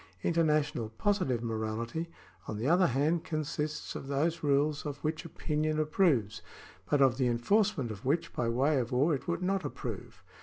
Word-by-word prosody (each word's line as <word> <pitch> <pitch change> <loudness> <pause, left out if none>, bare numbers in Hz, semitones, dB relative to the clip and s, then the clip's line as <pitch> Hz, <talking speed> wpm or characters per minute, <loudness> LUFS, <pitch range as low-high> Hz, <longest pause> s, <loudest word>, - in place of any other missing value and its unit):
International 150 -8 +1
positive 130 - 0
morality, 115 +8 -3 0.4
on 110 - -4
the 115 +5 -2
other 175 +3 +5
hand, 150 +6 +1
consists 155 -1 -3
of 135 - -7
those 155 +5 0
rules 145 +1 +1
of 145 -2 -4
which 155 +2 -2
opinion 155 -1 -1
approves, 150 - +2 0.5
but 145 -2 +4
of 130 -2 +3
the 130 -2 +2
enforcement 140 - +1
of 100 -2 -8
which 165 +5 0
by 120 -1 -1
way 135 +5 +2
of 120 -2 -3
war 140 +6 +3
it 135 - -4
would 170 +1 -1
not 195 +1 0
approve. - - -6
145 Hz, 165 wpm, -31 LUFS, 125-165 Hz, 0.5 s, other